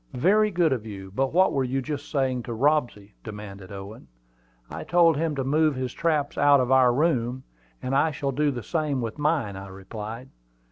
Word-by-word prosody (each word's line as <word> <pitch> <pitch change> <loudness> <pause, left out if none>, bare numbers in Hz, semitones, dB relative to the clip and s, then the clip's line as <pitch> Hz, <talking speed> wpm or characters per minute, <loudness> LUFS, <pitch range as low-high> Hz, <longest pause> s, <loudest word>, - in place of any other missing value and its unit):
"Very 210 +9 +4
good 170 -6 +2
of 120 -5 -3
you; 95 -3 -9
but 135 +4 0
what 185 +3 +3
were 135 - +1
you 130 +1 -1
just 145 +1 -5
saying 130 -4 0
to 120 - -5
Robsy?" 120 -7 0
demanded 105 -3 -9
Owen. 100 +4 -9 0.6
"I - - -7
told 170 -2 +4
him 155 0 -1
to 135 - -1
move 150 +2 +2
his 130 -1 -3
traps 150 -3 -1
out 145 -1 +6
of 125 0 0
our 130 -2 +6
room; 130 -3 0 0.4
and 130 - -2
I 140 +4 +3
shall 140 -2 -3
do 145 +3 +1
the 125 -4 -4
same 155 -5 -1
with 115 +4 -5
mine," 145 -9 0
I 95 0 -8
replied. 105 +6 -8
130 Hz, 195 wpm, -25 LUFS, 115-150 Hz, 0.6 s, out